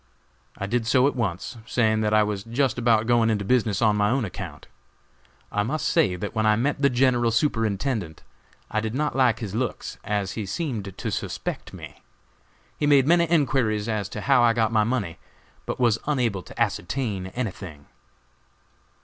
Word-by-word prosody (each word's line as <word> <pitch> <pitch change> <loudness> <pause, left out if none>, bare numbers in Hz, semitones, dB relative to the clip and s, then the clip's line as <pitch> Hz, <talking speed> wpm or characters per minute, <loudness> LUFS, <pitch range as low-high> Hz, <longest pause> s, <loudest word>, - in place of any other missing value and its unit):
I 100 - -3
did 115 +2 -1
so 130 +1 +4
at 140 - +1
once, 115 0 -3
saying 110 -2 +2
that 105 0 +1
I 110 0 +5
was 105 -2 -3
just 125 +2 0
about 115 -2 +3
going 120 -1 +3
into 105 -2 0
business 115 -3 +1
on 105 -1 +4
my 105 0 +2
own 130 0 +1
account. 95 - -8 0.9
I 105 - 0
must 140 +9 -1
say 130 - +2
that 100 +3 -5
when 110 -1 0
I 110 0 +4
met 140 +5 -1
the 140 - +5
General 125 -2 +2
Superintendent 115 - -1 0.5
I 110 - +1
did 110 +2 -3
not 150 0 -1
like 130 -4 +3
his 105 -4 -5
looks, 120 +2 -3
as 105 -2 -1
he 110 -3 -5
seemed 105 - -4
to - - -3
suspect - - -4
me. - - -11 0.8
He 145 - +1
made 140 -3 +5
many 170 +1 +3
enquiries 130 -9 +1
as 105 -4 -2
to 105 - -6
how 135 0 +4
I 120 -1 +5
got 115 -1 +1
my 110 -1 +3
money, 105 -8 -2 0.5
but - - -3
was 120 -3 +3
unable 120 -10 0
to - - -13
ascertain 105 -2 -1
anything. 95 - -6
115 Hz, 180 wpm, -24 LUFS, 105-130 Hz, 0.9 s, I